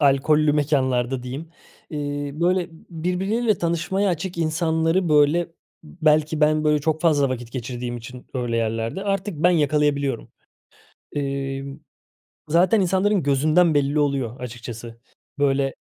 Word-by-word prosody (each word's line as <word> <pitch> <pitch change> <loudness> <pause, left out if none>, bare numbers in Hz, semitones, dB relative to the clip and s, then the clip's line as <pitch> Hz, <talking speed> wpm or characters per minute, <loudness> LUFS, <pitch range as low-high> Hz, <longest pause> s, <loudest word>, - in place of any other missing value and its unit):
alkollü 150 +2 +3
mekânlarda 130 -4 +1
diyeyim, 135 +6 -6 0.4
ııı, 145 0 -4
böyle 180 +1 +2
b - - -15 0.2
birbirleriyle 190 +6 0
tanışmaya 175 +4 0
açık 175 +1 -4
insanları, 165 +2 +1
böyle, 150 +3 +3 0.4
belki 155 -1 +1
ben, 155 0 +3
böyle, 150 0 +3
çok 160 +1 -1
fazla 150 -5 +3
vakit 120 -2 -5
geçirdiğim 120 -1 -4
için 125 +2 -10
öyle 120 -2 -1
yerlerde 115 - -2
artık 195 -1 -1
ben 180 - +6
yakalayabiliyorum. 145 -5 +1 0.8
Imm, 140 0 -4 0.7
zaten 180 +6 +4
insanların 190 +1 +2
gözünden 155 +4 +3
belli 145 +1 +1
oluyor, 135 -4 -1
açıkçası. 115 -1 -8 0.4
Böyle 135 -1 +1
150 Hz, 120 wpm, -23 LUFS, 135-170 Hz, 0.8 s, ben